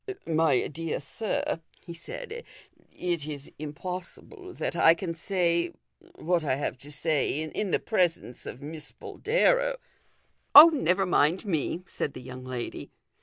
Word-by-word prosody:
" - - -37
My 160 -5 +2
dear 165 +1 -4
sir," 165 +3 -3 0.2
he 170 - -7
said, 460 - -8 0.3
" - - -32 0.2
it 160 -4 -2
is 145 -2 -7
impossible 180 - -7
that - - -3
I 165 -1 +6
can 170 -1 -4
say 170 -1 0 0.4
what 170 0 0
I 135 -4 +1
have 135 -2 -3
to 145 +3 -13
say 150 0 0
in 190 +6 -3
the - - +3
presence 175 - -1
of 135 - -8
Miss 150 0 -7
Boldero - - +1 0.4
" - - -42
".Oh, 305 +4 +13
never 195 - +1
rnind 180 +2 +2
me," 170 -1 -1
said 145 - -4
the 130 - -7
young 130 0 -9
lady. 130 -2 -5
165 Hz, 155 wpm, -28 LUFS, 145-190 Hz, 0.4 s, Oh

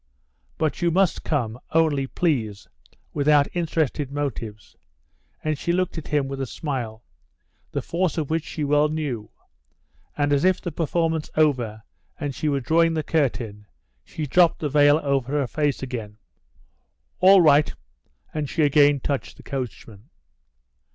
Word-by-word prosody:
"But 155 - -1
you 175 - +3
must 185 +1 +1
come, 125 -6 -1
only, 155 -4 +2
please, 115 - -1 0.5
without 145 0 +4
interested 155 -4 -1
motives," 115 -7 -5 0.7
and 155 -2 -1
she 170 - -1
looked 185 +1 0
at 160 - -6
him 145 -2 0
with 135 0 -5
a 135 - -2
smile, 120 -7 -5 0.7
the - - -3
force 175 -1 -1
of 155 -2 -2
which 160 -1 0
she 155 - -5
well 150 +1 +3
knew, 140 -9 -3 0.9
and, 145 0 +2
as 140 - +2
if 185 0 +3
the 175 - -5
performance 160 0 -1
over 120 -9 +1 0.4
and 145 -3 -3
she 150 +4 -1
were 140 -1 0
drawing 165 +4 +3
the 155 - -1
curtain, 120 -10 -1 0.4
she 155 - -5
dropped 170 +4 +4
the 150 - -2
veil 145 +1 +5
over 140 -1 0
her 145 -2 +1
face 145 +1 -1
again. 115 -5 -6 1.0
"All 190 +1 +7
right," 150 -2 +5 0.6
and 150 -3 -3
she 160 - +1
again 145 -1 +4
touched 140 0 -3
the - - -14
coachman. 120 -5 -7
145 Hz, 150 wpm, -24 LUFS, 130-160 Hz, 1.0 s, All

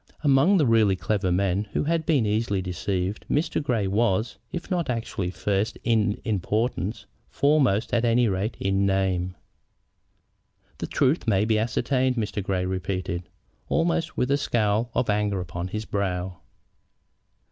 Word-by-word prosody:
Among 145 +7 +5
the 155 - +3
really 110 -5 +4
clever 95 +2 -1
men 95 +2 +1
who - - +1
had 160 +1 0
been 140 -8 +3
easily 105 -1 0
deceived 95 +1 -2
Mr. 155 +1 0
Grey 120 -8 0
was, 110 +1 0
if 175 +1 -6
not 175 -5 0
actually 115 -6 -2
first 100 +2 -1
in 110 -3 +1
importance, 110 0 -1 0.2
foremost, 135 -7 +2
at 120 -1 +2
any 120 0 +3
rate, 100 +3 -2
in 95 0 +1
name. 95 -2 0 1.4
"The - - -3
truth 140 0 +1
may 105 -1 +3
be 110 -1 +2
ascertained," 125 +3 +1
Mr. 105 -3 -2
Grey 95 -1 -1
repeated, 95 -2 -3 0.4
almost 165 -1 0
with 125 - +1
a 140 - +4
scowl 110 -3 +1
of 125 0 +1
anger 105 -2 +1
upon 90 0 -4
his 105 +3 -4
brow. 90 -3 -2
105 Hz, 145 wpm, -25 LUFS, 95-120 Hz, 1.4 s, Among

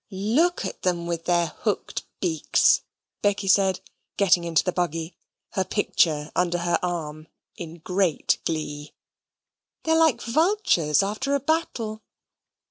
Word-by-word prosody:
"Look 225 - +1
at - - -6
them 175 -2 0
with 170 -1 -3
their 175 -1 +2
hooked 200 +6 -3
beaks," 160 -5 +3 0.4
Becky 200 -1 0
said, 190 -1 +3 0.4
getting 180 -3 +3
into 165 -2 +2
the 180 - 0
buggy, 165 -1 -3 0.4
her 190 - 0
picture 160 -6 0
under 175 -1 +1
her 175 0 0
arm, 155 -3 -4 0.3
in 165 -1 -8
great 180 0 0
glee. 150 -2 -4 0.9
"They're 320 0 +2
like 315 -8 +4
vultures 240 - +2
after 215 +8 -1
a - - +1
battle." 245 -8 -2
180 Hz, 125 wpm, -24 LUFS, 165-215 Hz, 0.9 s, like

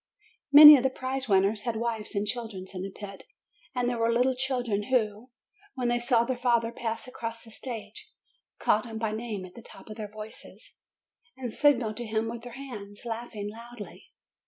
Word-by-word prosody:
Many 300 +1 +12
of - - 0
the 265 - +2
prize 260 0 -4
winners 200 +2 +3
had 235 -1 -2
wives 225 -1 -3
and 200 +1 0
children 220 -4 -5
in 185 - -5
the 195 - -4
pit, 195 0 -10 0.5
and 250 -1 0
there 245 -1 -1
were 230 0 +2
little 250 +2 +2
children 245 -6 -1
who, 225 -1 0 0.5
when 250 -2 -1
they 240 0 +1
saw 240 -1 +3
their 255 +2 -2
father 235 -2 +2
pass 230 0 -4
across 230 -2 -6
the 225 - -11
stage, 260 - -7 0.5
called 215 +3 +1
him 225 -1 -6
by 220 -1 -1
name 215 -3 -4
at 180 - -13
the 235 - -11
tops 220 - -14
of 215 - -8
their 210 -2 -6
voices, 215 +1 -11 0.6
and 245 -4 -5
signalled 245 -7 +2
to 240 -1 -5
him 220 +1 -1
with 235 0 -6
their 245 0 -10
hands, 215 -6 -9
laughing 225 -3 -5
loudly. 230 -1 -11
230 Hz, 190 wpm, -28 LUFS, 215-245 Hz, 0.6 s, Many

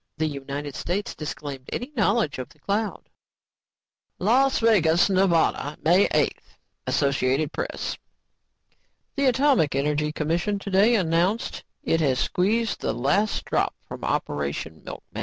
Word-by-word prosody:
The 160 - 0
United 140 -1 -5
States 190 +8 -3
disclaimed 140 -3 -7
any 250 +4 -4
knowledge 205 - +1
of 130 - -6
the 160 - -21
cloud. 200 +7 -2 1.1
"LAS 260 +7 +3
VEGAS, 190 -6 +4
NEV., 190 0 +3 0.6
May 180 +5 +5
8 - - +1 0.5
(AP) 140 +1 +1 1.6
The 280 -2 +1
Atomic 260 - +3
Energy 150 +2 0
Commission 170 +7 -1
today 200 +4 +3
announced 180 +3 0 0.2
it 165 - +1
has 135 -4 +2
squeezed 215 - 0
the - - -1
last 145 - 0
drop - - 0
from - - -8
Operation 75 +2 -3
Milkmaid." - - -9
165 Hz, 120 wpm, -25 LUFS, 145-210 Hz, 1.6 s, May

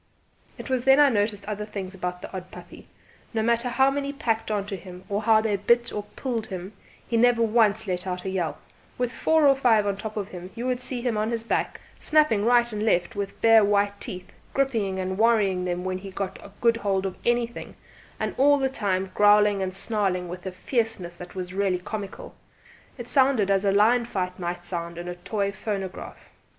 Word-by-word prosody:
It - - -8
was 260 -2 -1
then 270 0 +7
that 295 - +7
I - - +5
noticed 205 -3 0
other 210 0 -4
things 200 -3 -6
about 180 -1 -5
the - - -8
odd 185 0 -6
puppy: - - -12 0.5
no 220 - +1
matter 235 +2 +1
how 265 +2 +3
many 280 0 -2
packed 225 -7 -2
on 205 -2 -1
to 205 -1 -4
him, 180 -1 -11
or 205 +1 -1
how 220 0 +4
they 215 -2 0
bit 235 +4 +2
or 210 - -2
pulled 235 -5 -3
him, 185 +1 -7 0.3
he 230 - 0
never 235 0 +4
once 220 -2 +3
let 180 -1 -3
out 180 0 -4
a - - -1
yelp; 180 -4 -2 0.4
with 245 -1 -1
four 315 +5 +3
or 275 -1 +6
five 230 -6 +3
on 200 -1 -1
top 215 +1 -6
of 200 -1 -3
him 180 0 -8
you 235 +1 -4
would 255 -1 -1
see 255 -1 -3
him 240 -4 0
on 215 +1 0
his 230 -1 -2
back, 230 - -2 0.2
snapping 300 -10 +3
right 240 0 +3
and 210 0 -2
left 215 0 +1
with 200 -1 -4
bare 225 -1 +7
white 200 0 +1
teeth, 180 0 -7 0.2
gripping 225 -9 0
and 190 +1 -3
worrying 205 -5 +3
them 180 0 -2
when 185 0 -2
he 195 +1 -8
got 190 0 -5
a - - -11
good 230 -1 +4
hold 195 -3 -1
of 190 - -3
anything, 240 0 -1 0.4
and - - -2
all 285 +1 +6
the 270 -1 0
time 190 -6 -1
growling 205 -1 +5
and 190 -1 -1
snarling 190 -2 -1
with 180 +2 -7
a - - -3
fierceness 210 -3 -2
that 180 +1 -11
was 180 -1 -5
really 195 -1 +1
comical. 200 +2 -7 0.6
It 240 -2 -7
sounded 260 -6 +3
as 195 0 +2
a 195 - +4
lion 225 +4 +4
fight 185 -5 -3
might 175 0 -4
sound 170 -1 -4
in 175 0 -6
a 175 - -3
toy 200 +3 -2
phonograph. 195 -3 -6
205 Hz, 215 wpm, -25 LUFS, 190-235 Hz, 0.6 s, then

